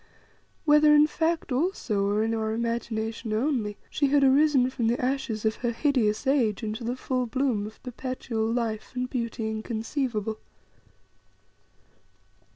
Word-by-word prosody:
Whether 300 0 +6
in 295 0 +7
fact 320 -1 -1
also, 250 - 0
or 210 +2 +1
in 225 +1 0
our 220 -1 -1
imagination 230 -1 -2
only, 225 -3 0
she 285 - +1
had 280 0 +3
arisen 275 -1 +4
from 240 -3 -1
the 235 +2 +1
ashes 250 -4 -2
of 220 0 +1
her 240 -1 -1
hideous 235 -4 +1
age 245 -6 +1
into 220 +2 -4
the 240 +2 -2
full 255 -1 -2
bloom 240 -4 0
of 215 - -14
perpetual 245 -3 -3
life 230 -3 -2
and 250 0 -1
beauty 235 -3 -3
inconceivable. 220 0 -3
235 Hz, 140 wpm, -27 LUFS, 220-270 Hz, -, in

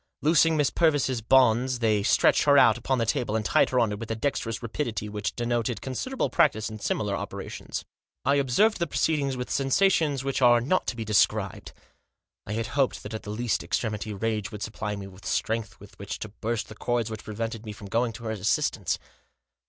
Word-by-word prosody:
Loosing 160 +1 +4
Miss 145 -3 +2
Purvis' 145 -7 +2
bonds 125 +1 +4
they 110 -3 +2
stretched 100 - +3
her 145 -1 +6
out 115 -5 +6
upon 130 +2 -1
the 115 - +1
table, 110 -1 -1
and 110 -1 -1
tied - - +3
her 125 - +1
on 115 -3 +2
it 105 - -4
with 115 - -7
a 115 - -1
dexterous 115 -2 -2
rapidity 115 -3 -3
which 105 -2 -4
denoted 120 -1 -1
considerable 255 - -2
practice 110 -10 +2
in 110 - -7
similar - - -1
operations. - - -6 0.4
I 140 - +4
observed 140 - +2
the 170 - 0
proceedings 140 -4 0
with 125 - -5
sensations 145 -1 +2
which 135 0 -2
are 120 -1 +6
not 145 +11 0
to - - -1
be 115 -1 -5
described. 105 -3 +1 0.8
I 105 - -3
had 115 +1 -1
hoped 140 -2 +1
that 105 - -7
at 110 - -4
the - - -9
last 115 +2 -1
extremity 110 -2 -2
rage 105 0 -2
would 105 -1 -6
supply 105 -1 -4
me 100 -1 -7
with 95 0 -13
strength 110 -1 -2
with 100 - -16
which 100 +1 -5
to 110 - -6
burst 115 +2 -3
the - - -8
cords 120 -1 -1
which 110 0 -6
prevented 115 +1 -4
me 110 - -6
from 105 0 -10
going 115 +3 0
to 115 - -10
her 110 - -3
assistance. 105 -2 0
115 Hz, 205 wpm, -26 LUFS, 110-130 Hz, 0.8 s, her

